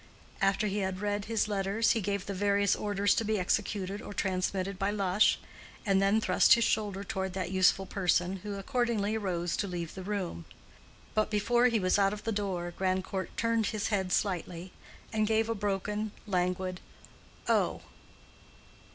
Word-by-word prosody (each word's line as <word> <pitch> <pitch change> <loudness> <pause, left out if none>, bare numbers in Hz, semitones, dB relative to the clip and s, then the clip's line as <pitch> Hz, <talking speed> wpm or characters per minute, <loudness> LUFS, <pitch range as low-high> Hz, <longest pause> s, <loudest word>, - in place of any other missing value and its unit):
After 195 +2 +2
he 205 0 -1
had 190 -1 -2
read 205 0 -1
his 225 -1 0
letters 200 +2 +1
he 225 - +1
gave 200 0 -1
various 200 0 +1
orders 205 -1 +1
to - - 0
be 215 0 0
executed 200 +1 -1
or 205 - -8
transmitted 190 0 -1
by 195 0 +1
Lush, 200 -1 +3 0.5
and 195 -2 +3
then 200 +3 +3
thrust 185 -4 +5
his 235 - +1
shoulder 205 -3 0
toward 190 -1 -3
that 185 -2 -3
useful 190 0 +3
person, 185 -1 +1
who 200 +2 -6
accordingly 220 -1 0
rose 175 -5 -1
to 200 - -1
leave 175 -3 -4
the 190 - -7
room. 185 - -4 0.7
But 215 0 +1
before 240 +4 +3
he 230 -3 +2
was 185 +1 +2
out 195 0 +3
of 210 - -7
the 225 - -1
door 185 -4 -2
Grandcourt 185 0 -2
turned 230 -1 +1
his 215 -2 -2
head 190 -4 0
slightly 180 -2 -2 0.4
and 215 -1 +1
gave 220 0 +2
a - - +2
broken, 210 +1 -2
languid 185 -1 -1 0.7
"Oh." - - +1
200 Hz, 165 wpm, -30 LUFS, 185-210 Hz, 0.7 s, thrust